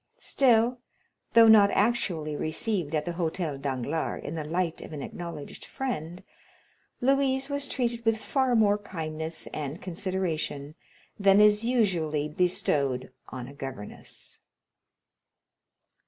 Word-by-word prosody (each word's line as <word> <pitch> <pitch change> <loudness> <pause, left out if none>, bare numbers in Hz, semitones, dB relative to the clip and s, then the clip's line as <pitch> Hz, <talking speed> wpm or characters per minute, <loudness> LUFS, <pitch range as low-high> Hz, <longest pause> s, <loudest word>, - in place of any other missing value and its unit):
Still, 245 -2 +3 0.5
though 230 -1 +8
not 210 -2 +8
actually 180 -10 0
received 160 +1 -1
at 150 -1 0
the 175 - -2
Hôtel 165 -4 -2
Danglars 140 +3 -2
in 150 - -5
the 160 -2 -3
light 165 +2 -2
of - - -9
an 145 -2 -5
acknowledged 170 -4 -7
friend, 185 - -4 0.8
Louise 270 +1 +2
was 285 0 -1
treated 235 -3 -2
with 225 -1 +2
far 260 +1 +1
more 210 -2 +4
kindness 160 -4 -4
and 150 +2 -4
consideration 175 -6 -3 0.5
than 195 0 +5
is 210 +1 +5
usually 175 -11 +1
bestowed 145 -6 0 0.2
on 125 -2 -6
a 140 - -10
governess. 135 -7 -8
175 Hz, 120 wpm, -28 LUFS, 155-225 Hz, 0.8 s, though